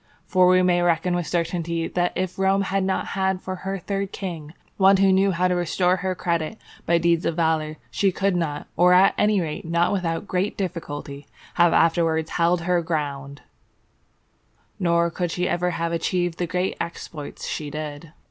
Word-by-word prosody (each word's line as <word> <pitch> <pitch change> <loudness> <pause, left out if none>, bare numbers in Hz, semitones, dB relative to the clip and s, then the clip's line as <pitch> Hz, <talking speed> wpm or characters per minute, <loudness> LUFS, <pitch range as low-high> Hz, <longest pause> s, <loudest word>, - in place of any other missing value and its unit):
For 185 -2 +4
we 185 0 +5
may 175 -1 +3
reckon 175 +1 +1
with 175 -2 -1
certainty 170 -1 -1
that 175 0 0
if 185 0 -3
Rome 195 +1 +2
had 195 0 -1
not 190 0 -1
had 190 -1 0
for 185 0 -5
her 195 +1 -4
third 195 +1 -3
king 165 -5 -6 0.2
one 195 0 +6
who 195 0 +4
knew 195 +1 +3
how 180 0 +1
to 180 - +1
restore 180 +1 +1
her 185 0 -2
credit 170 +3 -2 0.3
by 170 - +4
deeds 170 0 +2
of 165 - -1
valour, 160 -2 0
she 195 -1 +2
could 195 0 0
not, 155 -4 -2
or 180 +2 +5
at 185 +2 +6
any 210 -1 +2
rate 160 -4 -4
not 170 +3 +1
without 180 0 -2
great 185 +3 -1
difficulty, 145 -6 -5 0.3
have 175 -1 +4
afterwards 165 -1 +2
held 170 0 +2
her 175 0 +1
ground, 145 -4 -4 1.4
nor 170 -2 +2
could 175 -1 -3
ever 180 0 0
have 170 -1 -2
achieved 175 0 -1
the 175 - -1
great 180 +1 -1
exploits 165 -3 -7
she 150 -2 -4
did. 150 +1 -7
175 Hz, 175 wpm, -23 LUFS, 165-185 Hz, 1.4 s, one